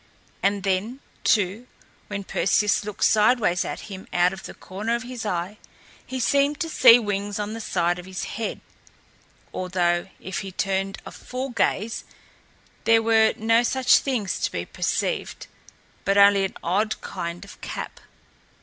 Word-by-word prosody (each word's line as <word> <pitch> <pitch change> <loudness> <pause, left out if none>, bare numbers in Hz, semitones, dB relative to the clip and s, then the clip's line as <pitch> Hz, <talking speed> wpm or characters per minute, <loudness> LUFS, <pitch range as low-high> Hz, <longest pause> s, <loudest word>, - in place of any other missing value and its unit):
And 200 0 +1
then, 200 +7 -1 0.2
too, 210 +3 +1 0.4
when 200 -1 -4
Perseus 210 +2 +2
looked 210 0 -4
sideways 210 -4 +3
at - - -5
him 190 -2 -9
out 175 +1 +3
of 190 - -9
the - - -9
corner 210 +5 -3
of 235 - -4
his 245 -3 -6
eye, 180 +3 -3 0.4
he 260 - -5
seemed 280 +3 +2
to 330 - -1
see 245 -6 +8
wings 205 -2 -2
on 210 0 -3
the 225 - -5
side 175 -3 0
of 180 - -10
his 190 0 -5
head; 225 0 -4 0.9
although, 175 -1 0
if 190 - -4
he 195 -1 -6
turned 195 +1 -1
a - - -8
full 255 +1 -5
gaze, 225 -1 0 0.8
there 225 0 +5
were 220 -1 +4
no 225 +2 +3
such 250 +1 +4
things 235 -9 -2
to - - -1
be 85 0 -3
perceived, - - -2 0.6
but 195 0 +2
only 200 -1 +6
an 190 - -6
odd 205 +6 0
kind 175 0 -5
of 200 - -14
cap. - - -6
205 Hz, 160 wpm, -24 LUFS, 190-230 Hz, 0.9 s, see